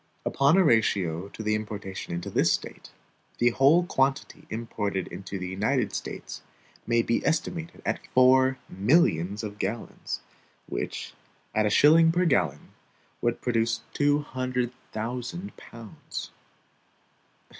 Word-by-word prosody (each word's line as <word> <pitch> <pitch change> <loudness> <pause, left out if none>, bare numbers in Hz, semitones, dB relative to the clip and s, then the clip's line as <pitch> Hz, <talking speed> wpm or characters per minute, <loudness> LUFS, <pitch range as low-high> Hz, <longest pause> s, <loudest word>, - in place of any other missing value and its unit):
Upon 140 +6 +3
a 190 - +6
ratio 100 - +2
to 110 - -8
the 105 0 +1
importation 105 -4 -5
into 85 0 -4
this - - +3
State, - - -4 0.5
the 120 0 +3
whole 145 +8 +4
quantity 135 -4 -1
imported 105 -4 -3
into 95 +2 -6
the 90 -1 -4
United 105 +3 0
States - - -6 0.5
may 115 0 +3
be 115 - 0
estimated 165 +1 -2
at - - -2
four 130 +1 +5
millions 100 - +2
of 105 -1 -6
gallons; 105 +4 -4 0.4
which, - - -5 0.4
at 110 -1 +2
a - - +2
shilling 160 +8 +6
per 180 +2 +1
gallon, 90 - +1 0.5
would 120 0 0
produce 115 -2 0
two 145 0 +3
hundred 130 -3 -2 0.2
thousand 125 - -5
pounds. 115 -3 -9
115 Hz, 125 wpm, -27 LUFS, 100-135 Hz, 0.5 s, a